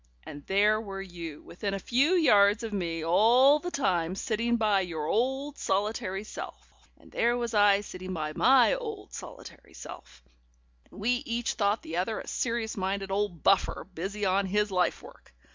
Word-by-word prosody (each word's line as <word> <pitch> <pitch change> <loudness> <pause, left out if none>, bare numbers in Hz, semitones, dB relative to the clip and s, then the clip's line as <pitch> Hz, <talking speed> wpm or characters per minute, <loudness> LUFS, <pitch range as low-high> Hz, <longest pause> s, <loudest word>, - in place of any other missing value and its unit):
And 145 0 -10
there 210 +2 +3
were 195 -3 -6
you 170 -5 -9
within 195 +3 -4
a - - -4
few 265 - +2
yards 210 - +4
of 225 -2 -5
me 165 -4 -3
all 245 - +5
the 355 - -5
time 185 - 0
sitting 235 +2 -1
by 210 -4 +2
your 165 -4 -4
old 265 - -1
solitary 200 0 -1
self, 215 - -9 0.3
and - - -20
there 240 +1 +1
was 235 -1 -3
I 205 -1 +4
sitting 185 -2 -8
by 155 -3 -3
my 255 - +5
old 440 -5 -6
solitary - - -11
self, - - -11 0.7
and - - -14
we 245 +4 +1
each 235 0 -1
thought 205 +1 0
the 165 - -5
other 200 +5 -1
a - - -9
serious 230 -2 -2
minded 195 0 -3
old 195 -6 -2
buffer, 195 - +2
busy 200 +5 -4
on 190 +1 +1
his 210 +2 0
life 180 -1 0
work. - - -16
205 Hz, 175 wpm, -28 LUFS, 185-235 Hz, 0.7 s, all